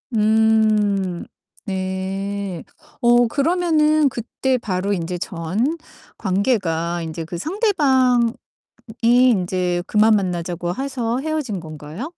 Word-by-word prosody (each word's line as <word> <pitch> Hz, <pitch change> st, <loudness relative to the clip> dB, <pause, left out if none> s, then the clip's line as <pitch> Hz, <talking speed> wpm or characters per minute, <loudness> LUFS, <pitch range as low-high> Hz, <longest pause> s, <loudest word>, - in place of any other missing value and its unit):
음 215 Hz, -4 st, +2 dB, 0.4 s
네. 190 Hz, -1 st, -3 dB, 0.4 s
어 240 Hz, 0 st, +5 dB
그러면은 310 Hz, 0 st, +2 dB
그때 255 Hz, +2 st, -2 dB
바로 195 Hz, -3 st, -2 dB
인제 175 Hz, 0 st, -3 dB
전 195 Hz, -, -2 dB, 0.4 s
관계가 180 Hz, -5 st, 0 dB
인제 165 Hz, 0 st, -5 dB
그 170 Hz, +1 st, -6 dB
상대방이 260 Hz, -, +2 dB, 0.7 s
인제 185 Hz, -8 st, +2 dB
그만 215 Hz, 0 st, +4 dB
만나자고 175 Hz, -2 st, -2 dB
해서 255 Hz, -2 st, -2 dB
헤어진 290 Hz, -, -3 dB
건가요? 155 Hz, -, -8 dB
210 Hz, 195 characters per minute, -21 LUFS, 180-250 Hz, 0.7 s, 어